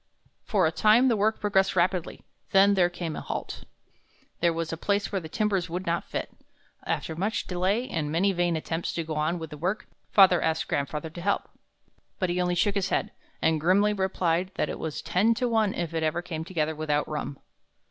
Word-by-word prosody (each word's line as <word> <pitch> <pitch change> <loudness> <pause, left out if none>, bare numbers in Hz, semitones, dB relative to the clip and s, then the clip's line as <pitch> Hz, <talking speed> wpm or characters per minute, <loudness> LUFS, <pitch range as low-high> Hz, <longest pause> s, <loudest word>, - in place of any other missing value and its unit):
For 195 -6 +2
a 160 - +2
time 220 +9 +5
the 235 - +3
work 215 +1 +1
progressed 195 -2 +2
rapidly; 180 -1 0 0.3
then 195 +1 +6
there 180 -3 +3
came 175 -3 -5
a - - -5
halt. - - -5 0.7
There 170 0 +3
was 165 0 -3
a - - -1
place 200 +5 -1
where 195 -2 -1
the 160 - -8
timbers 200 -2 0
would 180 +3 -4
not 170 0 -1
fit. - - -4 0.5
After 160 - -2
much 200 +7 -1
delay 190 +7 0
and 155 - -2
many 185 +5 +2
vain 175 -1 +1
attempts 165 +1 -3
to 165 - -2
go 160 0 -5
on 155 +3 0
with 160 -2 -7
the 150 - -8
work, 185 +7 -1 0.3
father 185 -4 +6
asked 160 0 0
grandfather 150 +3 -2
to 175 - -8
help; 200 +3 -1 0.7
but 185 -3 0
he 180 +1 0
only 180 0 +1
shook 205 +3 +2
his 195 -2 0
head, - - 0 0.3
and 160 -1 +2
grimly 200 +5 +4
replied 185 -2 0
that - - -1
it - - -5
was 160 -2 -4
ten 185 +8 +2
to 250 +2 0
one 220 -4 +1
if 170 -2 -3
it 165 - -1
ever 160 +2 0
came 160 -3 -4
together 160 -3 -1
without 150 -1 -1
rum. 150 -2 -4
175 Hz, 210 wpm, -27 LUFS, 160-200 Hz, 0.7 s, then